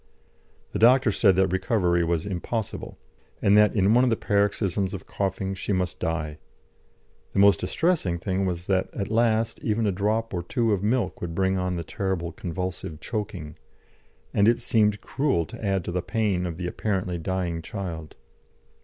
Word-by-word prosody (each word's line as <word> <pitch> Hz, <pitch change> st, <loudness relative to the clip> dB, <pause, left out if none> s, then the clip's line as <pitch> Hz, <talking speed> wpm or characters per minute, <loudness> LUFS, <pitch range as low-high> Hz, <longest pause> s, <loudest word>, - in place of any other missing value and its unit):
The -, -, -3 dB
doctor 125 Hz, +1 st, +6 dB
said 100 Hz, -2 st, +4 dB
that 95 Hz, -1 st, +2 dB
recovery 90 Hz, -2 st, +1 dB
was 85 Hz, 0 st, 0 dB
impossible, 100 Hz, +3 st, -4 dB, 0.4 s
and 100 Hz, -, +4 dB
that 105 Hz, +1 st, +5 dB
in 100 Hz, +1 st, +4 dB
one 125 Hz, +2 st, +5 dB
of 130 Hz, -, +3 dB
the 115 Hz, -, +2 dB
paroxysms 100 Hz, -2 st, 0 dB
of 95 Hz, -, -8 dB
coughing 95 Hz, 0 st, -2 dB
she 95 Hz, +2 st, -4 dB
must 90 Hz, -1 st, -1 dB
die; 75 Hz, -2 st, -2 dB, 0.9 s
the -, -, -4 dB
most 100 Hz, 0 st, +6 dB
distressing 160 Hz, -, 0 dB
thing 95 Hz, +2 st, -1 dB
was 90 Hz, -1 st, -3 dB
that, 95 Hz, -1 st, +1 dB
at 100 Hz, +1 st, -3 dB
last, 115 Hz, 0 st, +2 dB
even 110 Hz, 0 st, 0 dB
a 100 Hz, -, +2 dB
drop 105 Hz, +4 st, -1 dB
or 90 Hz, -, -1 dB
two 115 Hz, +5 st, 0 dB
of 95 Hz, -, 0 dB
milk 110 Hz, -1 st, 0 dB
would 85 Hz, -1 st, -4 dB
bring 95 Hz, 0 st, +1 dB
on 90 Hz, 0 st, -1 dB
the 85 Hz, -, -3 dB
terrible 85 Hz, -1 st, -2 dB
convulsive 90 Hz, -3 st, -5 dB
choking, 95 Hz, -7 st, -5 dB, 0.8 s
and 100 Hz, -, +4 dB
it 120 Hz, +1 st, +5 dB
seemed 105 Hz, -3 st, +2 dB
cruel 135 Hz, -, 0 dB
to 115 Hz, +4 st, -10 dB
add 95 Hz, -4 st, 0 dB
to -, -, -3 dB
the 90 Hz, +1 st, -1 dB
pain 100 Hz, -3 st, 0 dB
of 85 Hz, -, -4 dB
the 90 Hz, +1 st, -5 dB
apparently 90 Hz, -2 st, -2 dB
dying 85 Hz, -1 st, -2 dB
child. 85 Hz, -4 st, -6 dB
95 Hz, 175 wpm, -25 LUFS, 90-105 Hz, 0.9 s, doctor